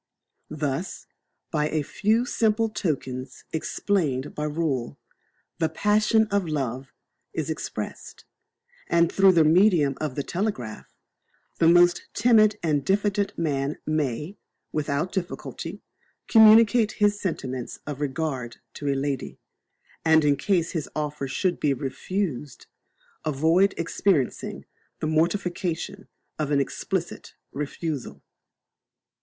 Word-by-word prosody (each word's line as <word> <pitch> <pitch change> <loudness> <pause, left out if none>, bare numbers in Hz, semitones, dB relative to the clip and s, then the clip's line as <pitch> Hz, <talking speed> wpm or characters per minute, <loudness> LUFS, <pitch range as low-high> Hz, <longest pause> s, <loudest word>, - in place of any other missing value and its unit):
Thus, 150 +3 -3 0.5
by 150 -1 +1
a 155 -2 0
few 215 - +1
simple 225 -2 +1
tokens 135 -9 -4
explained 155 -5 -1
by 150 - -3
rule, 150 -5 -2 0.6
the 160 -2 +2
passion 215 +5 +3
of 200 -3 +1
love 135 -3 -3 0.4
is - - -2
expressed; - - -6 0.6
and 170 0 +3
through 195 -1 +5
the 165 -2 +5
medium 160 -4 +4
of 150 -4 -2
the 140 - -2
telegraph, 170 - -3 0.7
the 165 - +5
most 175 +1 +5
timid 215 -2 +5
and 150 -4 +1
diffident 200 +3 0
man 145 -3 -1
may, 155 - -2 0.3
without 150 +3 -1
difficulty, 185 -3 -5 0.4
communicate 220 0 +6
his 205 0 +1
sentiments 130 -9 -4
of 145 -1 -5
regard 135 -4 -3 0.2
to 145 - -6
a 140 - +2
lady, 135 -1 -3 0.7
and, 160 -1 +5
in 145 -1 +4
case 170 +4 0
his 160 -5 -3
offer 150 -2 -3
should 180 +7 -1
be 140 -2 +2
refused, 150 +1 -4 0.6
avoid 160 +6 +3
experiencing 165 -4 0 0.3
the - - -2
mortification 170 +2 -1 0.3
of 150 -2 -1
an 145 -1 +3
explicit 175 +5 -3 0.2
refusal. 145 0 -5
160 Hz, 115 wpm, -25 LUFS, 140-195 Hz, 0.7 s, communicate